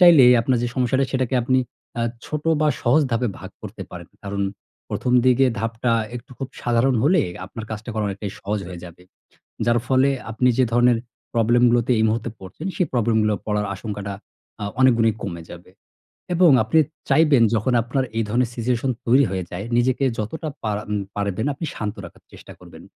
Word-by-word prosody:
চাইলে 170 -7 +8 0.2
আপনার 125 +1 +1
যে 120 - 0
সমস্যাটা, 130 +1 +2
সেটাকে 130 -1 0
আপনি 130 +2 +2 0.4
আ - - +1 0.2
ছোট 150 -1 -4 0.2
বা 155 - +3
সহজ 135 +6 +4
ধাপে 115 +1 +1
ভাগ - - -9
করতে - - -7
পারেন। - - -9 0.2
কারণ 100 0 -3 0.5
১ম 125 - -1
দিকের 130 +1 +4
ধাপটা 115 +1 -1 0.2
একটু 125 +3 -12
খুব 135 -1 -4
সাধারণ 120 +2 +2
হলে, 170 +5 +4 0.3
আপনার 110 +3 -8
কাজটা 110 +2 -5
করা 110 -1 -1
অনেকটাই 100 0 -5
সহজ 105 +2 -2
হয়ে 90 -2 -8
যাবে। 85 0 -12 0.6
যার 120 0 +3
ফলে 130 +1 +4 0.2
আপনি 125 +3 +1
যে 130 - +5
ধরনের 120 0 +4 0.4
problem 120 +1 +3
গুলোতে 120 +1 +2
এই - - +3
মুহূর্তে 110 +1 -1
পড়ছেন 95 - -8
সেই 180 - +1
problem 115 -2 +2
গুলো 105 - +2
পড়ার 105 -1 0
আশঙ্কাটা 100 -1 -5 0.5
আ - - -2 0.2
অনেক 130 -2 +6
গুণই 115 -1 +3
কমে 85 -4 -5
যাবে। 90 +1 -12 0.6
এবং 175 -1 +6
আপনি 110 +9 +2 0.3
চাইবেন 150 -6 +5
যখন 110 +4 +1
আপনার 130 +3 -1
এই 115 - +2
ধরনের 120 +2 +1
situation 125 +2 0 0.2
তৈরি 130 +4 +5
হয়ে 95 -2 -2
যায়, 90 +3 -5
নিজেকে 130 +3 +2
যতটা 155 +9 -4 0.2
পারা, 105 -1 -1
আম 105 - -1 0.2
পারবেন 100 +3 -1
আপনি 165 - -6
শান্ত 105 -1 -3
রাখার - - -13
চেষ্টা - - -12
করবেন। - - -14
120 Hz, 185 wpm, -22 LUFS, 105-130 Hz, 0.6 s, চাইলে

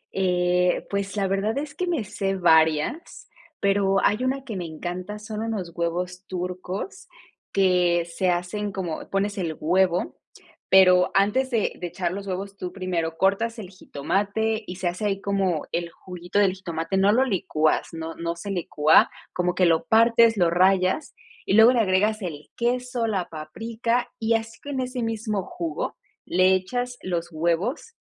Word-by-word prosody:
Eh, 180 -1 +1
pues, 200 0 -2
la 195 -1 +1
verdad 195 +5 0
es 295 +1 -4
que 360 - -3
me 325 -9 0
sé 195 -1 -2
varias, 160 - +2 0.3
pero 195 -1 +2
hay 215 +5 +2
una 265 +1 -1
que 225 -5 -5
me 180 -2 -4
encanta, 180 +5 -5
son 215 0 -6
unos 210 -6 -3
huevos 180 +2 -3
turcos 185 - -5 0.4
que 180 -3 +3
se 170 +2 -1
hacen 180 +4 -2
como 180 -5 -5
pones 200 +1 -1
el 165 -4 -3
huevo, 180 +2 +1 0.5
pero 185 -1 +6
antes 210 +7 +2
de 230 -4 0
de 175 - -3
echar 175 0 -3
los 200 +1 -6
huevos, 195 +1 -5
tú 180 -2 -5
primero 175 -4 -3
cortas 200 +6 +1
el 200 -4 -8
jitomate 205 +7 -2
y 180 - -6
se 185 -2 -2
hace 180 +4 -2
ahí 195 -1 0
como 190 -5 0
el 170 0 -2
juguito 180 +2 -6
del 195 -2 +4
jitomate 170 -1 -3
no 195 +2 +4
lo 255 +4 +3
licúas, 160 -8 +1
no 165 0 -6
no 170 0 -3
se 200 +4 -6
licúa, 160 -4 +4 0.2
como 180 0 0
que 180 - +3
lo 165 -2 +2
partes, 230 0 +5
lo 175 -2 +3
rayas, 185 - +2 0.3
y - - 0
luego 220 +4 +7
le 240 - +2
agregas 210 +1 +2
el 155 -5 -6
queso, 245 0 -1
la 195 -5 -2
paprika, 230 +10 -3
y 225 0 +2
así 225 0 -4
con 285 -2 -4
ese 255 0 -3
mismo 220 -3 -2
jugo 165 -4 -4 0.3
le 185 +2 +4
echas 245 +7 -2
los 175 -2 -3
huevos, 170 - -1
190 Hz, 165 wpm, -24 LUFS, 175-220 Hz, 0.5 s, luego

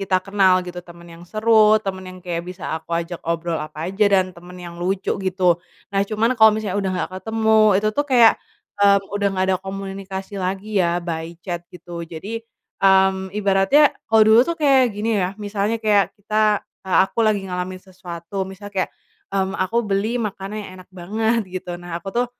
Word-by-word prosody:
kita 190 -1 +1
kenal, 190 -2 +3
gitu. 180 0 -7
Teman 170 0 -14
yang 165 +1 -13
seru, 215 0 +5
teman 190 -1 -4
yang 185 0 -10
kayak 170 -1 -3
bisa 180 0 -8
aku 160 +1 -12
ajak 170 +1 -4
obrol 170 -1 -1
apa 155 +2 -5
aja, 210 +2 +2
dan 190 -2 +2
teman 175 +1 -13
yang 170 -1 -8
lucu 190 +2 -1
gitu. 180 -2 +1 0.3
Nah 195 - +2
cuman 225 +3 +1
kalo 220 0 +9
misalnya 205 -3 -3
udah 190 - -1
nggak - - -3
ketemu, 220 0 +1 0.2
itu 210 +2 +1
tuh 290 - +2
kayak, 240 -4 +7 0.5
eee, 200 0 +6 0.2
udah 205 0 0
nggak 185 -1 0
ada 185 - +2
komunikasi 195 0 -6
lagi 190 +3 -3
ya, 170 - +2 0.2
by 165 0 -5
chat 175 -3 -3
gitu. 175 0 -9
Jadi, 195 +8 -6 0.4
mmm, 190 0 +4
ibaratnya, 200 +9 +4 0.2
kalo 220 0 +5
dulu 220 +2 +7
tuh 335 - -1
kayak 275 -4 +4
gini 210 0 0
ya, 180 - +1
misalnya 210 +1 -2
kayak 210 -2 +1
kita, 210 0 +1 0.2
eee, 190 - +1
aku 230 - -4
lagi 215 -3 +2
ngalamin 185 0 -4
sesuatu, 185 0 -6
misalnya 200 +2 -10
kayak, - - -17 0.4
mmm, 195 -1 -1
aku 185 +5 -1
beli 215 +3 -1
makanan 200 0 -5
yang 195 - -9
enak 180 - -16
banget, 220 +6 0
gitu, 180 -1 -6
nah 175 -1 -6
aku 185 - -9
tuh, 245 +1 +1
195 Hz, 190 wpm, -21 LUFS, 180-215 Hz, 0.5 s, kalo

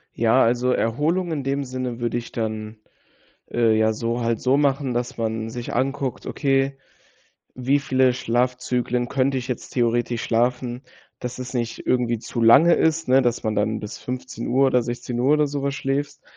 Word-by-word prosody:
Ja, 115 +3 +4
also, 125 +2 +2
Erholung 155 +11 0
in 145 -4 -3
dem 140 +1 -1
Sinne 130 -2 -4
würde 120 0 -1
ich 120 - -8
dann, 110 -1 -4 0.7
äh, 115 -2 +3
ja, 110 0 +3
so 115 +2 -2
halt 115 -1 0
so 130 +1 +3
machen, 140 -2 +1
dass 120 0 -3
man 110 -1 -2
sich 120 +1 -6
anguckt: 135 +1 -2
„Okay, 135 -1 0 0.8
wie 130 +3 +1
viele 130 -2 +2
Schlafzyklen 125 0 -1
könnte 135 +1 +1
ich 125 -1 -4
jetzt 125 -3 -5
theoretisch 120 -1 0
schlafen, 120 +1 0 0.4
dass 125 0 -5
es 125 0 -6
nicht 120 -2 -3
irgendwie 120 -2 +1
zu 115 +1 -5
lange 140 +9 +7
ist?“ 160 0 +1
Ne, 130 +1 +5
dass 120 -2 0
man 110 -2 0
dann 110 +1 0
bis 105 - -7
15:00 125 +1 -1
oder 125 -1 +3
16:00 120 +3 -1
oder 150 0 +3
sowas 140 -1 -2
schläfst, 140 +2 -3
125 Hz, 170 wpm, -23 LUFS, 120-135 Hz, 0.8 s, lange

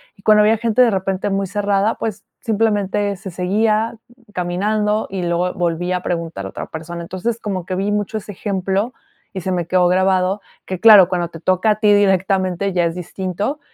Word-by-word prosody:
y 195 - -21
cuando 215 0 +5
había 220 +1 +4
gente 230 +2 +3
de 235 - +3
repente 195 0 -1
muy 195 0 -1
cerrada, 205 +1 0
pues 210 -2 -4 0.2
simplemente 205 -2 0
se 190 0 -8
seguía 215 +5 0 0.3
caminando 210 +4 -1
y 190 -2 -4
luego 175 +1 0
volvía 175 +1 -1
a 180 - -8
preguntar 165 - -3
a - - -5
otra - - -7
persona. 170 +2 -7
Entonces 190 +7 -3
como 190 -5 -4
que 185 - -4
vi 195 +2 -1
mucho 210 +1 -1
ese 205 - -9
ejemplo 195 +3 -2 0.4
y 190 - -3
se 185 - -3
me 175 -2 -1
quedó 180 +1 +3
grabado 185 +2 +2 0.3
que, 185 -2 -4
claro, 205 -5 +8
cuando 175 -2 -1
te 165 - -10
toca 185 +5 +2
a 210 - -1
ti 210 -1 +4
directamente, 190 -1 +2
ya 175 -1 +2
es 165 - -1
distinto. 190 - -4
195 Hz, 190 wpm, -19 LUFS, 180-210 Hz, 0.4 s, claro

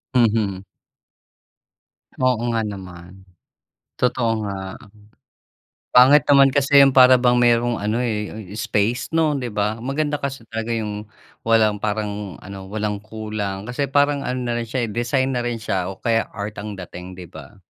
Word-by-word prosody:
Mhm. 110 -5 +2 1.5
Oo 130 -3 +1 0.2
nga 115 - +1
naman, 95 -2 -9 0.7
totoo 120 -2 +1
nga. 95 -1 -6 1.1
Pangit 130 +4 +7
naman 135 -1 +6
kasi 140 0 +4
yung 135 -1 +6
para 130 -1 +7
bang 125 0 +3
mayro'ng 120 0 +3
ano, 105 +3 -1
eh, 105 -4 -4
space 110 +2 -1
'no, 160 -2 +2
'di 125 -4 -3
ba? 105 +2 -2
Maganda 145 +2 -2
kasi 135 -4 -5
talaga 115 0 -5
yung 105 -2 -3 0.4
walang 110 -2 +2
parang 105 -2 -3
ano, 95 0 -10
walang 105 -1 -3
kulang 105 -2 -5
kasi 135 +2 -3
parang 145 0 +2
ano 125 +1 -3
na 120 - -1
rin 120 -1 -3
siya, 120 0 -1
eh, 105 - -7
design 130 +3 0
na 120 - -1
rin 120 -1 -3
siya 95 -4 -2
o 95 - -10
kaya 115 -1 0
art 105 0 -6
ang 105 -1 -7
dating, 90 0 -9
'di 90 - -8
ba? 80 +7 -13
115 Hz, 155 wpm, -21 LUFS, 105-125 Hz, 1.5 s, Pangit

